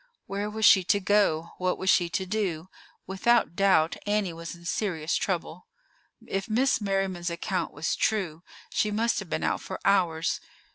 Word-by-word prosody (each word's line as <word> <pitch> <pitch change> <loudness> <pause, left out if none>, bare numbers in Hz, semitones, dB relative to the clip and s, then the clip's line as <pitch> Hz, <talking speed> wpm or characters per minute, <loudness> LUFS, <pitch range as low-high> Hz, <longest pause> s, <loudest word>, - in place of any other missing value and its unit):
Where 200 +2 -3
was 220 0 0
she 190 - +7
to 205 - +3
go? 185 -5 +2
What 185 0 0
was 190 - -5
she 175 -1 +3
to 190 +2 -2
do? 185 -4 -2 0.4
Without 195 +1 +2
doubt, 185 -5 +3
Annie 205 -4 0
was 165 +1 -7
in 170 0 -16
serious 175 -4 -1
trouble. 180 -2 -3 0.6
If 195 +3 -3
Miss 245 +2 +2
Merriman's 195 -3 -1
account 170 +1 -2
was 145 +3 -2
true, 185 -8 -1 0.3
she 210 - +1
must 225 +3 0
have - - -8
been - - -2
out - - 0
for - - -6
hours. 170 -5 +2
190 Hz, 165 wpm, -27 LUFS, 170-205 Hz, 0.6 s, she